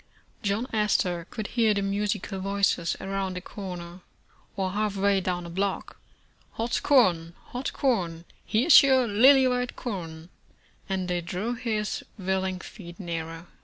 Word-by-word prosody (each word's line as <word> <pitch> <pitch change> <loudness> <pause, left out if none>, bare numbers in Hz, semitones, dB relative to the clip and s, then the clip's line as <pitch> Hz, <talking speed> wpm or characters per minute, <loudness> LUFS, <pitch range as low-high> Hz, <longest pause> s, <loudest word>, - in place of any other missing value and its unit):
John 205 +4 0
Astor 180 -5 +1
could 215 - -5
hear 225 -3 +2
the 200 - 0
musical 195 -1 -2
voices 195 -3 0
around 195 -1 -3
a - - -2
corner, 180 -3 -8 0.5
or 190 -1 -1
half 210 0 -1
way 200 0 +2
down 180 -1 -2
a - - -7
block, 195 +2 -3 0.2
' - - -37
' - - -35
Hot 230 +1 -1
corn, 175 - +3
hot 250 +2 -3
corn! 175 -11 -1 0.2
Here's 255 +9 +7
your 265 -3 +4
lily 260 +6 +6
white 250 -1 -1
corn," 170 -7 -6 0.6
and 190 -1 -1
they 175 -1 -1
drew 185 +7 -3
his 225 -3 -2
willing 190 -1 -1
feet 175 -3 -11
nearer. 165 -2 -5
195 Hz, 150 wpm, -27 LUFS, 180-220 Hz, 0.6 s, Here's